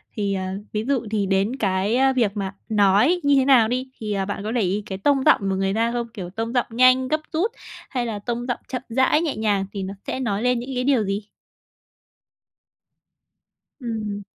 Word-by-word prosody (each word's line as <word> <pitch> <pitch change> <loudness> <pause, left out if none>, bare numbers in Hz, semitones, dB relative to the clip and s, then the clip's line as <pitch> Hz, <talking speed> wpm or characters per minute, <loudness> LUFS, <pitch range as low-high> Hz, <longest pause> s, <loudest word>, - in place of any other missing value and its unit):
Thì, 200 -2 -1
à, 190 0 -3 0.2
ví 215 +2 -2
dụ 265 -4 0
thì 210 -2 +1
đến 195 +5 +1
cái, 200 -1 0
ơ, 265 0 +4
việc 220 -5 +1
mà 195 0 -3
nói 210 - +4
như 285 0 +4
thế 265 -1 +3
nào 250 -5 +6
đi, 255 +2 -3
thì, 210 -2 -3
à, 195 -1 -1
bạn 200 0 -4
có 215 - -3
để 240 - +1
ý 200 +2 0
cái 190 - -5
tông 270 +5 +2
giọng - - +6
của 190 - 0
người 195 0 0
ta 230 +2 +1
không? 235 -1 -2
Kiểu, 185 -5 -6
tông 225 +5 -4
giọng 245 - +1
nhanh, 255 +2 +4
gấp 310 +3 +1
rút 375 +8 +1 0.4
hay 250 -2 -2
là 220 -3 -4
tông 240 +3 -3
giọng 245 - -2
chậm 255 -2 -4
rãi, 260 +6 +3
nhẹ 320 -4 -1
nhàng 205 -3 +1
thì 195 - -4
nó 190 +1 -5
sẽ - - -2
nói 220 -3 -1
lên 250 -1 +2
những 245 - -7
cái 250 - 0
điều 255 -5 +2
gì? 200 +1 -3 2.5
Ừm. 215 -4 -4
225 Hz, 215 wpm, -23 LUFS, 200-255 Hz, 2.5 s, nào